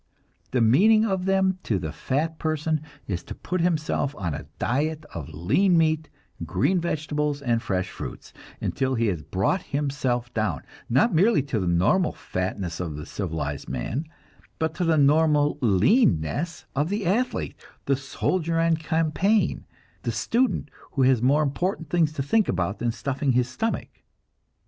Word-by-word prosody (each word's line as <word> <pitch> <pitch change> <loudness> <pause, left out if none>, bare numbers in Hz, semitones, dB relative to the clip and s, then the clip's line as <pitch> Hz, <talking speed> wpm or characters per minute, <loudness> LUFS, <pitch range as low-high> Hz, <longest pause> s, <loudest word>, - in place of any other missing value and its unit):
The 125 - +1
meaning 210 - +5
of 190 -4 -1
them 190 -1 +2
to 110 - 0
the 80 -4 -4
fat 150 - -2
person 155 -1 0 0.2
is 90 -3 -3
to - - -7
put 180 -1 -2
himself 155 -4 0
on 85 -5 -2
a - - -6
diet 150 +5 -1
of 80 -5 -6
lean 170 - +2
meat, 155 -1 +2 0.3
green 90 - +1
vegetables 150 -3 -1
and 120 -4 0
fresh 95 -4 -2
fruits, - - -8 0.3
until 130 -1 -1
he 115 -1 +1
has 85 -5 -2
brought 95 - 0
himself 135 -7 -2
down, 105 - -1 0.3
not 145 - +3
merely 185 - +4
to 135 -6 -2
the 90 - -1
normal 95 - +2
fatness 90 -2 -4
of 85 -5 -3
the 75 +1 -7
civilized 80 -8 -4
man, 90 - -3 0.5
but 160 0 -1
to 180 - -2
the 165 -2 +3
normal 150 0 +4
leanness 125 - +2
of 145 +4 +1
the 205 0 -2
athlete, 225 +9 0 0.3
the 140 - +2
soldier 165 +5 -1
on 165 -1 +3
campaign, 165 +6 +2
and - - -9 0.4
the - - -2
student 245 - 0 0.2
who 135 - +2
has 130 -3 +4
more 140 +5 +4
important 160 +2 -2
things 165 -3 +3
to 140 - -2
think 215 +10 +2
about 95 +3 -1
than 120 -1 0
stuffing 135 +2 -1
his 125 0 +2
stomach. 220 - -2
145 Hz, 160 wpm, -25 LUFS, 110-165 Hz, 0.5 s, meaning